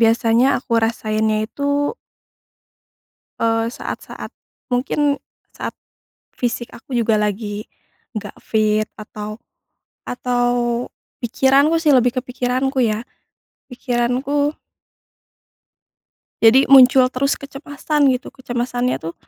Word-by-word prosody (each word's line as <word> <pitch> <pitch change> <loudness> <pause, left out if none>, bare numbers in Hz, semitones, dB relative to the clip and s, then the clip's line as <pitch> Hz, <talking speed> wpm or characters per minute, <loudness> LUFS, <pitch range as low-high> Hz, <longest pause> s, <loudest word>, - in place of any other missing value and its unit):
Biasanya 230 +2 +4
aku 245 - -8
rasainnya 215 -1 0
itu 285 - -1 1.4
eee, 225 0 +1
saat-saat 240 - -7 0.4
mungkin 280 +3 +1 0.3
saat - - -6 0.6
fisik 240 -1 -3
aku 245 +1 -5
juga 220 -2 +2
lagi 210 0 -3 0.5
nggak 205 -1 -7
fit 215 -1 +1
atau 215 0 -7 0.7
atau 245 -1 0 0.7
pikiranku 275 +6 +3
sih, 305 -2 +4
lebih 250 0 +2
ke - - -7
pikiranku 255 +2 -1
ya, 220 -2 +1 0.7
pikiranku 250 +4 0 1.9
jadi 260 +5 +6
muncul 260 -1 +7
terus 270 +2 0
kecemasan 285 0 0
gitu 250 - -4
kecemasannya 245 -1 -2
tuh 165 +1 -6
245 Hz, 95 wpm, -20 LUFS, 225-270 Hz, 1.9 s, muncul